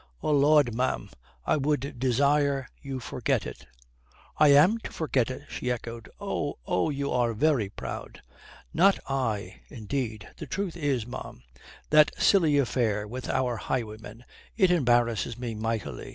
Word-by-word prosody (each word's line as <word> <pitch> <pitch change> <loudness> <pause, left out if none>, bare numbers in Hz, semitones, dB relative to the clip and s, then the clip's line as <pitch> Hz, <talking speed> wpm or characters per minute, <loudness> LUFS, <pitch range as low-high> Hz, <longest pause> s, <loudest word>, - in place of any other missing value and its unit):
"Oh - - +1
Lud, 145 -3 +4
ma'am, 115 - -1 0.3
I - - +2
would 140 -3 -1
desire 140 +2 +2
you 135 -2 -5
forget 125 - -1
it." - - -9 0.7
"I 150 - +7
am 150 +11 +6
to - - -8
forget 135 -7 0
it!" 130 +2 -6
she 125 - -4
echoed. 115 -1 -5
"Oh... - - -3
Oh, 90 - +1
you 140 -1 -2
are 120 -2 +1
very 130 -5 +2
proud." - - -8 0.5
"Not 190 +5 +5
I, 125 -7 -2
indeed. 110 -3 -4
The - - -7
truth 195 -4 -3
is, 140 -8 -1
ma'am, 115 - -8 0.5
that 150 0 +5
silly 165 -7 +4
affair 115 -6 0
with 125 +3 -6
our 125 -3 0
highwayman, 110 -1 -5 0.3
it 190 -5 +4
embarrasses 120 - +2
me 120 -2 -4
mightily. 110 0 -4
130 Hz, 145 wpm, -27 LUFS, 115-145 Hz, 0.7 s, I